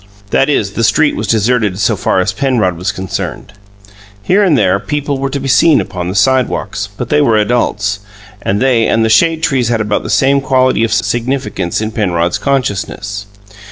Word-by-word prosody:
That 135 - +2
is, 105 -9 0
the 115 - -2
street 145 +8 +2
was 110 - -3
deserted 110 -2 +1
so 105 +2 +1
far 95 - 0
as 90 - 0
Penrod 125 -10 0
was 90 +4 -2
concerned. 95 +1 -5 0.7
Here 195 - +2
and 170 -7 +3
there - - +2
people 145 -2 -3
were 135 0 -2
to 140 - -3
be 135 - -5
seen 145 +3 +4
upon 90 -1 -4
the 95 - -4
sidewalks, 130 +5 0
but - - -5
they 75 - +3
were 110 +4 +3
adults, 105 -2 0 0.4
and 100 +1 -1
they 125 -4 +2
and 115 0 +2
the - - +1
shade 165 +6 +3
trees 130 -6 +1
had 115 -1 0
about 105 -1 -1
the - - -7
same 140 +1 +2
quality 130 -3 +2
of 115 - 0
significance 110 -4 -1
in 110 0 -3
Penrod's 90 -6 -1
consciousness. 105 -6 -2
115 Hz, 190 wpm, -13 LUFS, 100-135 Hz, 0.7 s, seen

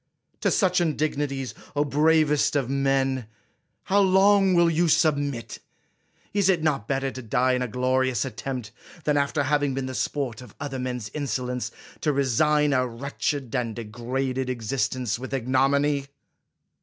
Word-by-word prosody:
To - - +1
such 185 -3 +2
indignities, 145 -4 -1 0.2
O 145 +1 +2
bravest 150 0 +3
of 135 -3 0
men, 135 -3 +1 0.6
how 200 +2 +2
long 195 0 +5
will 170 0 +5
you 165 +1 +2
submit? 145 -6 +1 0.7
Is 200 -2 +2
it 175 -4 +2
not 140 -9 0
better 135 0 -1
to 130 - -7
die 125 +3 +1
in 125 - 0
a 125 - -1
glorious 130 0 +1
attempt, 125 -2 -5 0.3
than, 150 - +1
after 145 +1 +1
having 145 -1 +1
been 135 -1 -2
the 130 - -5
sport 130 -3 -2
of 125 - -13
other 135 -2 -4
men's 125 -4 -4
insolence, 125 -5 -2 0.3
to 150 - +1
resign 145 +2 +2
a 130 -1 +2
wretched 135 +1 -3
and 115 -3 -1
degraded 125 +3 -3
existence 120 -1 -2
with 130 +1 -4
ig 125 -2 -4
nominy? 140 +2 +2
135 Hz, 150 wpm, -25 LUFS, 125-150 Hz, 0.7 s, long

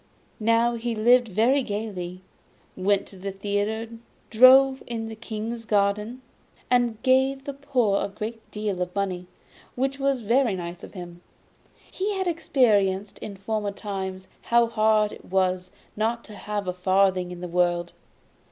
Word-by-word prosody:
Now 230 +2 +3
he 235 0 -3
lived 240 +3 +4
very 230 +7 +3
gaily, 200 -5 -5 0.5
went 195 +1 +1
to 195 - -14
the 195 +2 -5
theatre, 205 +3 -2 0.4
drove 265 +3 +7
in 225 -2 -4
the 220 - -7
King's 225 +1 -5
garden, 210 +3 0 0.5
and 240 -3 +2
gave 265 +1 +3
the 280 - -4
poor 255 -8 +1
a - - -3
great 220 +3 -7
deal 210 -3 -3
of 180 0 -3
money, 185 -3 -2 0.5
which 270 +2 -1
was 275 -2 +1
very 230 0 +2
nice 175 -1 -7
of - - -11
him; 175 -1 -9 0.7
he 405 +2 -2
had 380 -1 -1
experienced 210 - +1
in 200 -2 -7
former 210 +1 -2
times 190 -2 -5
how 235 0 +3
hard 215 -2 +2
it - - -10
is 185 -1 +1 0.3
not 230 +2 -1
to 215 - -12
have 205 -1 -4
a 180 - -1
farthing 185 0 +2
in 180 -1 -8
the 180 - -4
world. 175 0 0
215 Hz, 150 wpm, -25 LUFS, 190-240 Hz, 0.7 s, drove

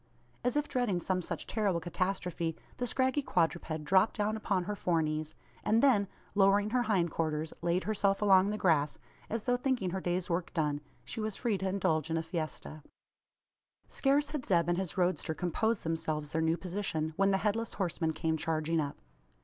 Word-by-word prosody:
As 250 - +1
if 295 0 +1
dreading 245 -9 0
some 185 +1 0
such - - -5
terrible 205 -6 0
catastrophe, 175 -1 -2 0.2
the 245 - -2
scraggy 260 +3 +1
quadruped 165 - 0
dropped 190 +7 +3
down 210 +1 +1
upon 200 -4 0
her 205 +3 -3
fore 170 -4 +1
knees; 155 0 -3 0.3
and 225 +3 +3
then, 215 -8 +5 0.3
lowering 200 +1 +4
her 250 0 +3
hind 195 -8 +1
quarters, 155 0 -2
laid 175 +2 +1
herself 200 -2 +1
along 195 -1 +5
the 210 - -2
grass, 150 -7 +2 0.3
as 225 -1 -2
though 245 0 +2
thinking 245 -8 0
her 190 +1 -3
day's 175 0 -1
work 175 0 -1
done 150 -3 0 0.2
she 125 - -6
was 215 -2 -2
free 235 -4 0
to 190 - -1
indulge 165 -5 0
in 165 - 0
a 165 - -1
fiesta. 155 -2 -5 1.1
Scarce 285 +2 +2
had 300 -4 -3
Zeb 170 -6 +2
and 175 0 +1
his 190 -2 -4
roadster 180 -2 +1
composed 200 +7 0
themselves 155 -2 -2
their 160 - 0
new 160 +1 +2
position, 175 -4 -2
when 195 +2 +3
the 195 - +3
Headless 225 +2 0
Horseman 170 -4 -1
came 160 +1 0
charging 160 +1 0
up. 145 -1 -4
185 Hz, 185 wpm, -32 LUFS, 160-210 Hz, 1.1 s, then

